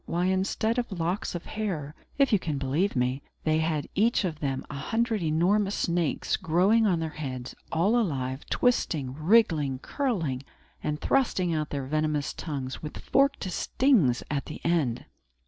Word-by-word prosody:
Why, 175 Hz, +2 st, 0 dB
instead 195 Hz, +5 st, +1 dB
of 240 Hz, -3 st, -3 dB
locks 175 Hz, +3 st, -1 dB
of 170 Hz, -, -5 dB
hair, 175 Hz, -10 st, -3 dB, 0.2 s
if 275 Hz, -4 st, +3 dB
you 205 Hz, -, +5 dB
can 155 Hz, -5 st, -3 dB
believe 145 Hz, +9 st, 0 dB
me, 125 Hz, +2 st, 0 dB, 0.2 s
they 155 Hz, 0 st, +2 dB
had 160 Hz, -2 st, -1 dB
each 215 Hz, 0 st, +2 dB
of 160 Hz, -4 st, -3 dB
them 135 Hz, -3 st, -2 dB
a -, -, -8 dB
hundred 225 Hz, -, -1 dB
enormous 185 Hz, +6 st, +2 dB
snakes 170 Hz, -3 st, 0 dB
growing 195 Hz, +7 st, +3 dB
on 175 Hz, -4 st, +2 dB
their 160 Hz, -1 st, -3 dB
heads, 130 Hz, -5 st, -5 dB, 0.2 s
all 175 Hz, +8 st, +2 dB
alive, 135 Hz, -, -1 dB
twisting, 155 Hz, -, +1 dB
wriggling, 155 Hz, -, +3 dB
curling, 165 Hz, -, -2 dB, 0.4 s
and 150 Hz, 0 st, -2 dB
thrusting 185 Hz, -, +1 dB
out 155 Hz, -2 st, -1 dB
their 140 Hz, -2 st, -3 dB
venomous 155 Hz, 0 st, 0 dB
tongues, 135 Hz, -5 st, -5 dB
with 150 Hz, -, -7 dB
forked 275 Hz, +1 st, +2 dB
stings 185 Hz, -, +2 dB
at 140 Hz, -2 st, -1 dB
the 155 Hz, -, -7 dB
end! 155 Hz, -9 st, +1 dB
165 Hz, 160 wpm, -27 LUFS, 145-205 Hz, 0.4 s, you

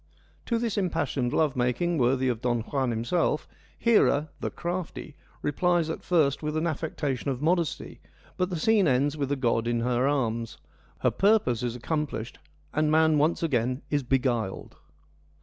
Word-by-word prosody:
To 235 Hz, -, +1 dB
this 230 Hz, -3 st, -1 dB
impassioned 160 Hz, -9 st, -1 dB
love 155 Hz, -2 st, +1 dB
making, 130 Hz, +7 st, 0 dB
worthy 130 Hz, +1 st, +2 dB
of 120 Hz, -3 st, -1 dB
Don 120 Hz, -2 st, 0 dB
Juan 130 Hz, +2 st, -1 dB
himself, 120 Hz, +7 st, 0 dB, 0.3 s
Hera, 155 Hz, -10 st, +3 dB
' -, -, -33 dB
the -, -, -1 dB
crafty,' 175 Hz, -3 st, -5 dB, 0.3 s
replies 170 Hz, +2 st, +1 dB
at -, -, -6 dB
first 155 Hz, -6 st, +2 dB
with 150 Hz, 0 st, -2 dB
an 160 Hz, -, 0 dB
affectation 145 Hz, -4 st, -2 dB
of 130 Hz, -2 st, -2 dB
modesty, 165 Hz, 0 st, -1 dB, 0.3 s
but 180 Hz, 0 st, 0 dB
the 180 Hz, -, -3 dB
scene 210 Hz, 0 st, +3 dB
ends 140 Hz, +2 st, +2 dB
with 140 Hz, -3 st, -2 dB
the 145 Hz, -, +1 dB
god 115 Hz, -3 st, 0 dB
in 120 Hz, -1 st, 0 dB
her 125 Hz, +2 st, +1 dB
arms: 115 Hz, -5 st, -1 dB, 0.4 s
her -, -, +3 dB
purpose 195 Hz, -, +2 dB
is 120 Hz, -1 st, -2 dB
accom 150 Hz, +3 st, -2 dB
plished 110 Hz, +2 st, -6 dB, 0.4 s
and 155 Hz, 0 st, +2 dB
man 160 Hz, -1 st, +4 dB
once 155 Hz, +3 st, +1 dB
again 130 Hz, -3 st, 0 dB
is 145 Hz, -1 st, +2 dB
beguiled. 125 Hz, -6 st, -1 dB
145 Hz, 165 wpm, -27 LUFS, 125-165 Hz, 0.4 s, man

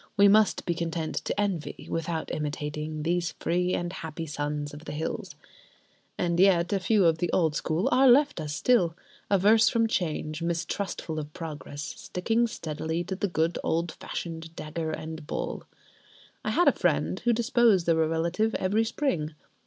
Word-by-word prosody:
We 200 Hz, 0 st, +7 dB
must 210 Hz, +1 st, +4 dB
be 175 Hz, -, +1 dB
content 165 Hz, -1 st, -3 dB
to -, -, -2 dB
envy, 195 Hz, -7 st, -2 dB
without 165 Hz, 0 st, -3 dB
imitating, 150 Hz, +1 st, -3 dB
these 170 Hz, +1 st, 0 dB
free 180 Hz, +1 st, +1 dB
and 175 Hz, +1 st, -3 dB
happy 160 Hz, -2 st, -5 dB
sons 145 Hz, -1 st, -3 dB
of 150 Hz, +2 st, -10 dB
the -, -, -5 dB
hills. 160 Hz, +2 st, -4 dB, 0.8 s
And 170 Hz, -1 st, 0 dB
yet 180 Hz, -1 st, +4 dB
a 195 Hz, -, +2 dB
few 195 Hz, +1 st, +3 dB
of 165 Hz, -1 st, +3 dB
the 175 Hz, -, 0 dB
old 160 Hz, -4 st, +2 dB
school 160 Hz, +5 st, 0 dB
are 265 Hz, +2 st, +5 dB
left 285 Hz, +4 st, +4 dB
us 150 Hz, -, -4 dB
still: 180 Hz, -9 st, +3 dB, 0.3 s
averse 210 Hz, +3 st, +5 dB
from 230 Hz, -1 st, +2 dB
change, 155 Hz, -5 st, -2 dB
mistrustful 170 Hz, -1 st, -2 dB
of 150 Hz, 0 st, -6 dB
progress, 150 Hz, -2 st, -6 dB
sticking 225 Hz, +10 st, -1 dB
steadily 160 Hz, -3 st, -3 dB
to 190 Hz, +2 st, -4 dB
the 200 Hz, -, -1 dB
good 165 Hz, -1 st, 0 dB
old 165 Hz, +1 st, 0 dB
fashioned 165 Hz, -1 st, -6 dB
dagger 160 Hz, +1 st, -4 dB
and 155 Hz, -1 st, -6 dB
bowl. -, -, -4 dB, 0.8 s
I -, -, -1 dB
had -, -, +3 dB
a -, -, +8 dB
friend 75 Hz, +4 st, 0 dB
who 240 Hz, -, +2 dB
disposed 230 Hz, -5 st, +3 dB
of 165 Hz, -1 st, +3 dB
a 160 Hz, -, +3 dB
relative 170 Hz, +7 st, 0 dB
every 210 Hz, +4 st, +1 dB
spring. 180 Hz, -, -1 dB
170 Hz, 170 wpm, -27 LUFS, 155-195 Hz, 0.8 s, a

